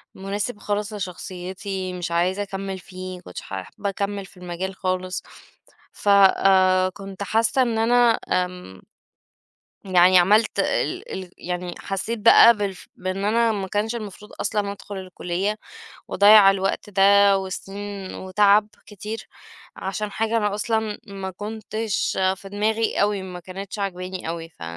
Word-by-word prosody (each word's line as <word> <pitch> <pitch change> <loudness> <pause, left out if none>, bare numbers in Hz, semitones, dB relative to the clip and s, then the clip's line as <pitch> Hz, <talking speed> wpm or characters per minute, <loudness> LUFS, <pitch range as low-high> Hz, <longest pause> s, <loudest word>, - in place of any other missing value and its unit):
مناسب 205 +3 -4
خالص 210 +1 -2
لشخصيتي، 185 0 -5
مش 175 -2 -4
عايزة 180 +4 +1
أكمّل 195 -1 -5
فيه، 185 0 -8
ما - - -14
كُنتش 90 - -8
ح - - -14 0.2
حابة 200 - -5
أكمّل 200 0 -3
في 195 - -18
المجال 180 +1 -5
خالص. 185 0 -2 0.7
ف 205 - -2
آآ، 190 -1 +5
كُنت 195 +1 -8
حاسة 225 +6 +2
إن 235 -3 +1
أنا، 235 +1 +4
آمم 180 - -2 1.1
يعني 180 0 +6
عملت 210 +5 +3
ال 390 +7 -1
ال 185 -2 -6
يعني 180 0 -4
حسيت 215 +4 -3
بقى 230 +1 +8
بالف 200 -3 -4
بإن 185 +2 -3
أنا 230 +2 +3
ما 200 -3 -3
كانش 210 +4 -1
المفروض 210 -2 -8
أصلًا 205 -1 -1
أدخُل 200 0 -9
الكلية، 185 +2 -3 0.5
وأضَيَّع 205 0 +7
الوقت 195 +1 -2
ده 200 0 +5
وسنين 195 +1 -6
وتعب 205 +2 +3 0.2
كتير 210 +2 -7 0.5
عشان 205 +2 -4
حاجة 225 +2 0
أنا 210 -2 +1
أصلًا 220 0 -1
ما 195 -2 -6
كُنتش 215 +2 -3 0.2
في 195 - -11
دماغي 215 +3 0
أوي 205 -1 +1
ما 180 -1 -7
كانتش 190 +3 -8
عاجباني 185 -2 -4
أوي، 165 0 -6
ف 160 - -17
195 Hz, 140 wpm, -23 LUFS, 185-210 Hz, 1.1 s, بقى